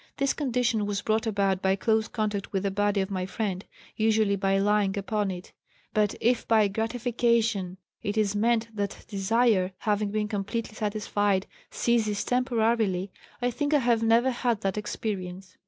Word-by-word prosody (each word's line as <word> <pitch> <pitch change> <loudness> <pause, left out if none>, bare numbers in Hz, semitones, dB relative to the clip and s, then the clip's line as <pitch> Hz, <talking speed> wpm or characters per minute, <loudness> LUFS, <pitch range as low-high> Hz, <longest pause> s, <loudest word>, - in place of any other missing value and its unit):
This 275 -1 +1
condition 245 -6 0
was 205 0 -2
brought 220 +1 +1
about 195 -3 +1
by 190 0 +2
close 220 +1 +1
contact 210 -2 -2
with 195 -1 -1
the 200 - 0
body 205 0 +1
of 190 +1 -3
my 185 -1 -2
friend, 195 -2 -3 0.3
usually 220 -2 +2
by 195 0 +1
lying 205 0 +2
upon 205 0 -1
it. 180 -1 -7 0.4
But 210 -1 +2
if 240 +1 +1
by 220 -2 +4
'gratification' 225 -3 0 0.2
it 205 +1 -3
is 210 -2 +1
meant 230 +1 +1
that 200 -1 -4
desire, 200 -1 +2
having 210 -1 0
been 210 0 -1
completely 215 +2 -3
satisfied, 205 -2 0 0.2
ceases 215 -4 +1
temporarily, 225 -6 +1 0.3
I 245 - +2
think 290 +4 0
I - - +7
have 235 -4 +2
never 230 +3 +4
had 240 -3 -1
that 195 -2 -1
experience. 190 -3 -5
210 Hz, 160 wpm, -27 LUFS, 195-230 Hz, 0.4 s, I